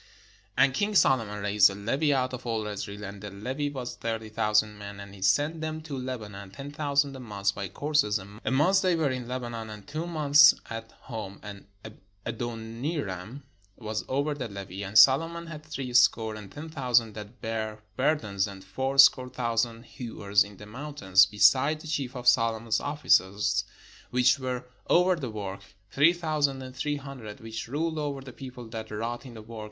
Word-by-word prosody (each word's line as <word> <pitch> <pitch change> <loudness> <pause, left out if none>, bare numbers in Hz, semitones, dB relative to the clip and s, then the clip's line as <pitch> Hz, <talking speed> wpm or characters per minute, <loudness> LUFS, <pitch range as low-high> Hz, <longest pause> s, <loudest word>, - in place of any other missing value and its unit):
And 140 -1 +5
king 205 +6 0
Solomon 115 - +3
raised 105 0 +5
a 95 - -6
levy 135 +9 0
out 130 -2 +1
of 125 0 -6
all 110 -2 -1
Israel; 105 0 -5
and 100 0 -7
the 105 - -6
levy 130 +9 -3
was 130 -4 -5
thirty 115 -1 -4
thousand 105 0 +1
men. 100 0 -8
And 100 0 -10
he 100 - -13
sent 145 +12 +2
them 155 0 -3
to 155 -3 -6
Lebanon, 110 -7 -6
ten 135 +9 -8
thousand 145 -1 0
a - - -8
month 100 -4 -1
by 100 -1 -4
courses: 145 -3 +1
a 95 - -9 0.2
month 155 +9 +4
they 185 -3 +2
were 155 -4 +1
in 125 -2 -4
Lebanon, 120 -3 -5
and 105 -1 -9
two 155 +4 -4
months 150 -3 +6 0.2
at 115 0 -6
home: 110 -5 -7
and 100 -1 -9 0.6
Adoniram 115 - -4 0.3
was 110 -2 -4
over 140 +3 0
the 135 -4 -4
levy. 100 -2 -7
And 100 +2 -1
Solomon 165 +7 +6
had 155 -2 -8
three 135 -5 -5
score 115 -2 +4
and 105 -2 -9
ten 155 +2 -8
thousand 125 -7 +2
that 105 +3 -10
bare 110 -1 -4
burdens, 110 -9 +1
and 95 -1 -10
fourscore 130 +4 +4
thousand 115 -1 -1
hewers 105 -6 0
in 100 -1 -12
the 105 - -10
mountains; 105 -6 +3
besides 130 +10 +4
the - - -9
chief 140 -5 -2
of 125 -1 -5
Solomon's 115 -2 +3
oflficers 100 -9 +2 0.4
which 125 +2 +3
were 125 -1 -3 0.2
over 180 +1 +5
the 140 -7 -5
work, 100 -3 -5 0.3
three 150 +5 +5
thou 155 -3 -2
sand 135 -2 +1
and 130 0 -9
three 145 +2 -1
hundred, 135 -7 -9
which 110 0 -6
ruled 160 +5 -2
over 145 -2 -3
the 130 -2 -10
people 125 -3 -9
that 110 -1 -6
wrought 115 +4 -4
in 120 - -11
the 110 - -9
work. 115 0 -9
120 Hz, 185 wpm, -28 LUFS, 105-140 Hz, 0.6 s, months